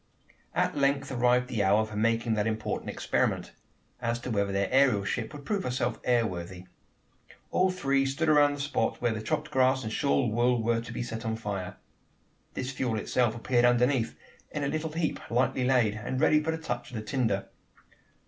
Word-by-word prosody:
At - - +1
length 140 -1 +1
arrived 125 0 +2
the 115 -5 -1
hour 105 +3 +3
for 110 -1 -9
making 115 +1 +1
that 105 0 0
important 110 -1 -3
experiment - - -1 0.5
as 115 -1 0
to 125 - -5
whether 100 -2 0
their 100 0 0
aerial 130 -6 +4
ship 110 +1 -2
would 145 -2 -10
prove 205 -2 0
herself 125 -3 -1
air 120 -2 +3
worthy. 90 -1 -6 0.9
All 185 +1 +3
three 140 -7 +1
stood 135 +4 -1
around 145 -1 +5
the 145 - -5
spot 145 +1 -1
where 120 -2 +1
the 110 - -4
chopped 150 +7 -2
grass 130 0 +3
and 110 0 -4
shawl 140 -4 +1
wool 120 +1 +2
were 115 0 +1
to 115 - -9
be - - -3
set 110 -2 -5
on 110 0 -1
fire. 100 -4 -5 0.8
This 130 +1 -3
fuel 125 -4 -1
itself 120 +1 +1
appeared 120 +1 +1
underneath 120 0 +2 0.3
in 145 - -4
a - - 0
little 155 +1 -2
heap 165 -1 -1
lightly 125 +1 +1
laid, 125 -5 +3
and 110 +4 -4
ready 150 0 +4
for 155 - -3
the 160 - 0
touch 120 -7 -4
of 125 - -9
the 110 - -4
tinder. 110 -5 -1
120 Hz, 195 wpm, -28 LUFS, 110-140 Hz, 0.9 s, around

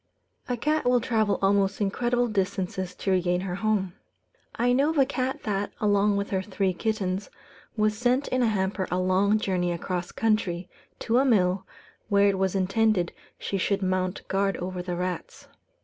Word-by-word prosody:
A 245 - 0
cat 305 +4 0
will 250 0 +4
travel 220 -4 +1
almost 195 0 +2
incredible 240 +4 +1
distances 190 -3 -2
to 195 - -2
regain 180 -1 +1
her 185 -1 -4
home. 195 -2 0 0.6
I 245 +2 +2
know 275 +4 +3
of 320 - -2
a 275 - +5
cat 260 -1 -3
that, 200 -1 -2
along 205 -1 +3
with 200 0 -3
her 190 -1 +1
three 190 -1 -1
kittens, 195 -1 -2 0.5
was 215 0 +2
sent 250 +5 +1
in 255 - +1
a 240 - +3
hamper 190 -2 -1
a 180 - 0
long 185 +3 +3
journey 180 -4 0
across 175 +1 -3
country, 195 -6 0 0.3
to 235 +2 +2
a - - +4
mill, 190 -7 +2 0.4
where 200 -1 +4
it 195 -1 +1
was 190 0 0
intended 195 -1 +1 0.2
she 195 - -3
should 195 +1 0
mount 185 0 -1
guard 195 0 0
over 180 0 -4
the 180 0 -4
rats. 180 -1 -5
200 Hz, 175 wpm, -26 LUFS, 185-220 Hz, 0.6 s, a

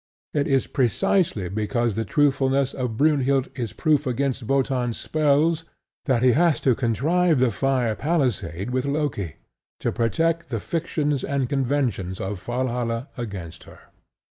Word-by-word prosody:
It 145 -2 +1
is 135 -2 +2
precisely 125 - +1
because 110 +4 -1
the 110 +2 -2
truthfulness 135 +3 +2
of 125 -4 -3
Brynhild 140 -2 +2
is 120 -5 -4
proof 150 -2 +1
against 130 +1 -1
Wotan's 125 -1 0
spells 155 +2 +2 0.4
that 130 -5 +2
he 130 - +6
has 165 +4 +3
to 130 - +4
contrive 150 - +2
the 125 -2 +3
fire 125 -1 +1
palisade 120 - -1
with 130 +1 0
Loki, 140 - -2 0.4
to - - -1
protect 165 +8 0
the 115 -4 -2
fictions 150 - -1
and 140 -2 -1
conventions 125 -9 -1
of 95 -1 -4
Valhalla 120 +1 -2
against 95 -9 -7
her. - - -14
130 Hz, 140 wpm, -24 LUFS, 115-145 Hz, 0.4 s, he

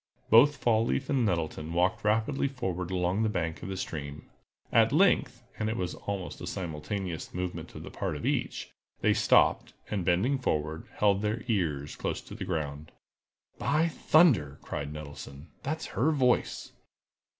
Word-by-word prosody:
Both 140 +6 +7
Fall 115 -3 +3
leaf 65 - -1
and 135 -3 +2
Nettleton 80 -3 -2
walked 90 +2 +1
rapidly 110 +7 +1
forward 95 -10 -3
along 90 +2 0
the 110 - +2
bank 80 -5 -2
of 95 - -6
the 95 - -4
stream. 75 -4 -6 0.4
At 115 -1 +5
length—and 125 - +1
it 115 - -2
was 90 -1 -2
almost 100 -3 -5
a - - -5
simultaneous 85 +1 -4
movement 90 0 -4
on - - -7
the - - -9
part - - -3
of - - -5
each—they - - -1
stopped, - - +3 0.2
and 100 -4 -1
bending 100 +11 +2
forward, 80 - -2
held 100 -1 +3
their 105 +2 -1
ears 80 - -1
close - - -2
to - - -12
the - - -5
ground. 75 -3 -4 0.7
"By 155 +3 +2
thunder!" 130 - +4
cried 70 0 -4
Nettleton, 75 0 -9
"that's 155 +3 -3
her 140 +7 +2
voice!" 130 -5 +1
95 Hz, 155 wpm, -29 LUFS, 80-120 Hz, 0.7 s, Both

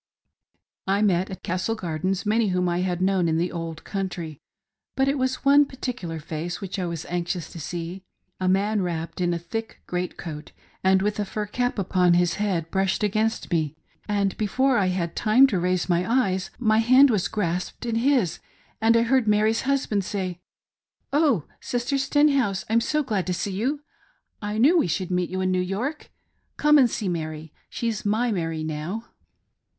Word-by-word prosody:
I 200 +2 +2
met 185 -2 +2
at 190 - -8
Castle 185 +5 -1
Gardens 185 +1 -2
many 220 +1 +2
whom 180 -1 +1
I 175 0 0
had 180 -1 -1
known 190 -2 +2
in 160 - +1
the 175 +2 0
old 165 -2 -5
country; 180 -6 -4 0.6
but 265 0 +2
it 275 - +2
was 260 +1 -1
one 285 +1 +7
particular 250 - -5
face 160 +3 -5
which 195 0 -5
I 180 - -1
was 170 -2 -5
anx 175 0 -2
ious 175 - -7
to 170 - -8
see. 170 +4 -5 0.4
A 185 0 +1
man 200 +2 +2
wrapped 170 0 -3
in 175 -1 +2
a 170 - 0
thick 220 +7 -6
great 180 0 -3
coat, 155 -3 -8 0.3
and 190 0 +4
with 210 +1 -1
a - - +2
fur 210 +1 -4
cap 245 +4 -1
upon 180 -2 +3
his 175 -1 +2
head, 175 -6 -1
brushed 190 +1 0
against 215 +2 0
me; 155 -3 0 0.3
and 200 -2 0
before 250 +4 +2
I 190 - +2
had 180 -2 -2
time 235 +5 +5
to 205 -9 +1
raise 180 0 0
my 180 +3 +1
eyes, 190 -7 +1
my 220 -2 +3
hand 255 +4 +6
was 205 -5 +1
grasped 180 +2 -3
in 230 -1 -1
his, 245 - +2 0.4
and 225 +1 +5
I 230 - +4
heard 250 -1 +2
Mary's 215 +1 +3
husband 240 -8 +1
say 185 -3 -3 0.4
" - - -37
Oh 285 - +3 0.2
Sister 245 +3 -1
Stenhouse, 275 -7 +2
I'm 230 +1 +4
so 300 +5 0
glad 210 -9 -1
to 180 - 0
see 200 - -2
you: 260 +9 -1 0.6
I 210 0 -3
knew 300 +10 +5
we - - +2
should 180 +2 -2
meet 180 -1 0
you 185 +1 -2
in 185 0 +1
New 185 0 +1
York. 220 - -3 0.5
Come 300 0 +5
and 250 -3 +5
see 210 - -3
Mary. 155 -3 -4 0.2
She's 230 -3 -3
my 225 +4 +1
Mary 165 -5 -2
now! 160 +9 -4
195 Hz, 190 wpm, -25 LUFS, 175-230 Hz, 0.6 s, one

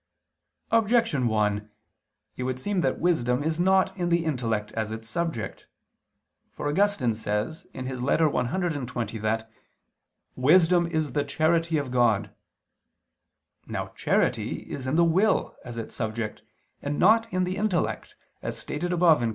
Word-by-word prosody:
Objection 225 - +3
1: 105 -1 0 0.7
It - - -6
would 130 0 -2
seem 195 +5 -1
that 130 - 0
wisdom 135 -7 +1
is 160 +1 -1
not 190 +1 +3
in 175 -2 -1
the 170 -1 +2
intellect 115 -8 -1
as 110 -1 -2
its 110 0 -6
subject. 160 -1 -3 0.8
For - - -5
Augustine 155 - +2
says 110 +8 -3
(Ep. 130 - -5
cxx) 130 - -1
that 110 +1 -1 0.8
"wisdom 170 +5 +4
is 155 -3 -1
the 145 - 0
charity 160 +3 +1
of 140 -4 -3
God." 115 -5 +2 1.3
Now - - -4
charity - - 0
is 130 -2 -5
in 130 - 0
the 170 - +5
will 185 +6 +2
as 120 -2 -8
its 115 - -6
subject, 110 0 -3 0.4
and 145 0 -2
not 225 +4 +4
in 185 0 +1
the 185 +1 -2
intellect, 200 -4 -1 0.3
as - - -4
stated 175 +4 -4
above 170 -3 +5
(Q. 120 -1 0
145 Hz, 140 wpm, -26 LUFS, 115-175 Hz, 1.3 s, the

